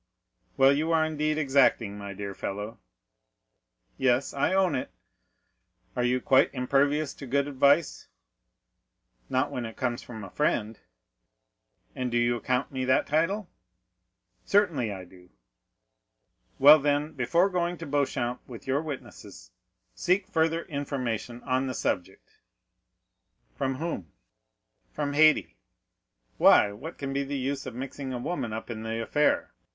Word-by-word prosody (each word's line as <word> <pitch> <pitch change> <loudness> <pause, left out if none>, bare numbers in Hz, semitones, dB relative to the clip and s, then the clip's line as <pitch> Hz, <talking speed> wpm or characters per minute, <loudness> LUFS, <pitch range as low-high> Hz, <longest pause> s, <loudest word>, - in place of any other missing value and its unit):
"Well, 135 +1 +6
you 155 +4 0
are 160 -1 +3
indeed 155 0 -1
exacting, 130 -7 +2
my 100 -1 -7
dear 100 0 -6
fellow!" 105 +4 -5 1.2
"Yes, 130 +1 +2
I 140 +4 +1
own 190 -3 +2
it." 130 - -2 1.1
"Are 125 - 0
you 125 +1 +2
quite 130 +1 +4
impervious 140 +3 +1
to 140 - -10
good 140 +3 +1
advice?" 145 +3 +2 1.2
"Not 130 +3 0
when 125 - -3
it 115 -1 -7
comes 120 -2 -2
from 110 -3 -9
a 95 - -9
friend." 110 -7 -1 1.2
"And 125 -1 -2
do 120 - 0
you 120 0 +2
account 125 +3 -1
me 130 -1 -3
that 130 0 +3
title?" 170 +7 0 1.0
"Certainly 165 - +2
I 95 -2 -7
do." 90 0 -18 1.3
"Well, 150 +3 +9
then, 145 +1 0
before 170 +8 +2
going 175 -1 -1
to 165 - -7
Beauchamp 140 -4 -1
with 120 -3 -10
your 135 +2 0
witnesses, 150 -10 -9 0.4
seek 185 +2 +1
further 165 +1 +1
information 125 -5 -4
on 130 0 0
the 130 - -4
subject." 95 +2 -3 1.3
"From 135 -1 -2
whom?" 135 - -5 0.8
"From 145 -1 -3
Haydée." 155 - +4 0.8
"Why, 100 - +6
what 135 +12 -9
can 135 -1 -4
be 140 0 0
the 140 +1 -4
use 135 +1 -3
of 125 - -7
mixing 135 +1 -6
a 125 - -3
woman 120 -2 -3
up 110 +2 -5
in 110 -1 -6
the 110 +1 -3
affair? 150 +6 +1
135 Hz, 140 wpm, -27 LUFS, 120-150 Hz, 1.3 s, Well